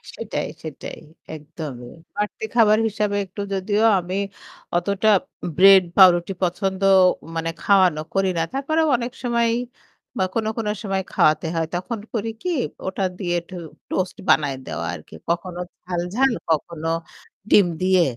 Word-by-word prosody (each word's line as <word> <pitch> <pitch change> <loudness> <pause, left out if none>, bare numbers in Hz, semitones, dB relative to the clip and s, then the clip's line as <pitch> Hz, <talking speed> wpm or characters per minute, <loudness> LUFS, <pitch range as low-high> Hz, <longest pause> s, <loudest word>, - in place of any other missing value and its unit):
সেটাই, - - -3 0.2
সেটাই - - -7 0.4
একদমই। 145 -5 -8 0.2
বাড়তি 210 +1 -3
খাবার 215 -2 +5
হিসাবে 210 -1 -1
একটু 200 +2 -7
যদিও 205 +3 0 0.2
আমি 180 +1 -5 0.6
অতটা 200 +4 +1 0.5
bread, 195 0 +8
পাউরুটি 180 -1 +6
পছন্দ 190 +2 -1 0.5
মানে 165 0 -1
খাওয়ানো 185 -6 +4
করি 195 -1 +2
না। - - +2
তারপরেও 315 +4 +1
অনেক 240 +1 -4
সময় 235 -1 +2 0.7
বা 190 - +2
কোনো, 220 -1 0
কোনো 210 -2 -1
সময় 195 -2 -1
খাওয়াতে 155 +1 +3
হয় 165 -1 +1
তখন 195 +6 -3
করি 225 -1 -1
কি 360 - -2 0.4
ওটা 195 +1 -2
দিয়ে 175 -3 -2
একটু 185 +2 -12 0.3
toast 185 0 -2
বানায় 145 -3 +3
দেওয়া 85 +2 -4
আর 75 - -7
কি। - - -12
কখনো 175 +1 -2 0.2
ঝাল, 175 -1 -2
ঝাল, 270 0 +4 0.2
কখনো 160 +1 -1 0.6
ডিম 200 - +7 0.2
দিয়ে, 185 -1 +4
190 Hz, 140 wpm, -22 LUFS, 170-210 Hz, 0.7 s, bread